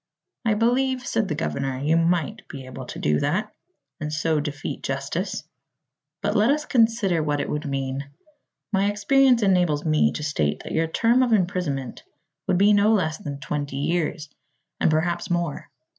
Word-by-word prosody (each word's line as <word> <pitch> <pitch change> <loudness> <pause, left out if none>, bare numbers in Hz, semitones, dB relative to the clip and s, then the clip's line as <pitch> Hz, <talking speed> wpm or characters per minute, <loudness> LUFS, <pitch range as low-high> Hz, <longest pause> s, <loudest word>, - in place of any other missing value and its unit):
"I 220 -2 +3
believe," 250 +3 +1
said 220 -4 0
the 150 - -2
governor, 135 -4 -2
"you 150 +5 +1
might 165 -1 0
be 135 -2 -8
able 130 -1 -8
to - - -8
do 75 0 +1
that, 210 +9 -1 0.5
and 150 -1 -4
so 155 0 +1
defeat 145 -1 -4
justice. - - -3 0.8
But - - 0
let - - +4
us 300 +2 +1
consider 225 - +2
what 145 -1 0
it - - -2
would 150 +2 -3
mean. 135 0 -3 0.6
My 195 +1 +3
experience 245 +4 +3
enables 180 -6 +2
me 155 -1 +3
to 150 - -5
state 75 - -1
that - - -7
your 165 0 +1
term 230 +9 +3
of 245 -3 +2
imprisonment 175 - -1 0.5
would 180 - +2
be 205 +3 +5
no 205 +1 +4
less 160 -7 +1
than 140 -1 -6
twenty 145 -2 -3
years, 155 +1 -1 0.5
and - - +3
perhaps 170 +2 0
more. 170 -5 -2
165 Hz, 170 wpm, -24 LUFS, 145-210 Hz, 0.8 s, be